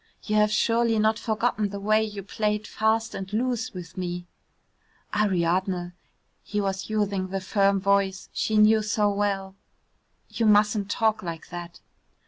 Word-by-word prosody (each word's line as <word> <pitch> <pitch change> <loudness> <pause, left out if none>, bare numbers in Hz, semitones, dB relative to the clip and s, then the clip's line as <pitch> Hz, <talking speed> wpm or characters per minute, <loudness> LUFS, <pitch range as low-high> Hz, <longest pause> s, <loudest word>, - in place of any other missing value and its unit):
"You 215 - -1
have 210 0 +4
surely 230 +1 +2
not 215 +1 +2
forgotten 220 -1 0
the 200 0 -6
way 215 +2 +2
you 205 -2 -5
played 210 +1 -1
fast 220 +2 0
and 190 0 -6
loose 235 +1 -1
with 180 -1 -9
me?" 175 -1 -4 0.9
"Ariadne," 180 -2 +1 0.5
he 210 - -3
was 195 0 -2
using 200 -3 0
the 195 +1 -3
firm 195 +1 +2
voice 195 0 +1
she 215 - 0
knew 215 +1 +6
so 210 -1 +1
well, 200 -1 -1 0.7
"you 230 - -1
mustn't 210 -1 +3
talk 220 +1 +1
like 165 -3 -7
that." 175 0 -8
205 Hz, 145 wpm, -26 LUFS, 190-215 Hz, 0.9 s, knew